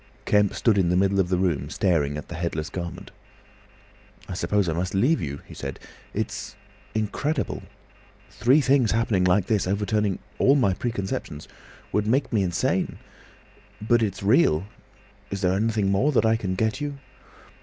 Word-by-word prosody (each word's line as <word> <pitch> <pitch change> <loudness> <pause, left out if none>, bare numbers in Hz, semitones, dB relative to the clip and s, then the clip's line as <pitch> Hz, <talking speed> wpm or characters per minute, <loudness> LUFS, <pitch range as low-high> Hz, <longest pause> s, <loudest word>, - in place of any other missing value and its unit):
Kemp 105 -1 +3
stood 110 -4 +3
in 90 -3 +2
the 90 - +2
middle 100 +1 +2
of 90 -2 +1
the 90 - +1
room 80 -6 0
staring 75 -6 +1
at 75 - -7
the - - -8
headless 80 -1 -3
garment. 85 -2 -6 1.2
"I - - -5
suppose 100 +1 0
I 80 - 0
must 90 +4 -2
leave 130 +12 +3
you," 70 -1 -5
he - - -12
said. 70 -1 -6 0.4
"It's—incredible. 110 +8 -4 0.7
Three 130 +7 +3
things 135 -5 +3
happening 115 -4 +1
like 90 +1 +3
this, 105 -4 0
overturning 105 0 0 0.2
all 135 - +5
my 120 -9 +3
preconceptions—would 100 -1 -5
make 130 +3 +1
me 105 - +3
insane. 90 -3 0 0.8
But 120 +2 +2
it's 100 -3 -2
real! 100 - +3 0.6
Is 100 0 -4
there 90 -1 +2
anything 105 -1 +1
more 130 +10 +2
that 120 - +3
I 110 0 +4
can 95 -4 -2
get 110 +7 -1
you?" 145 -1 -3
100 Hz, 155 wpm, -25 LUFS, 90-115 Hz, 1.2 s, all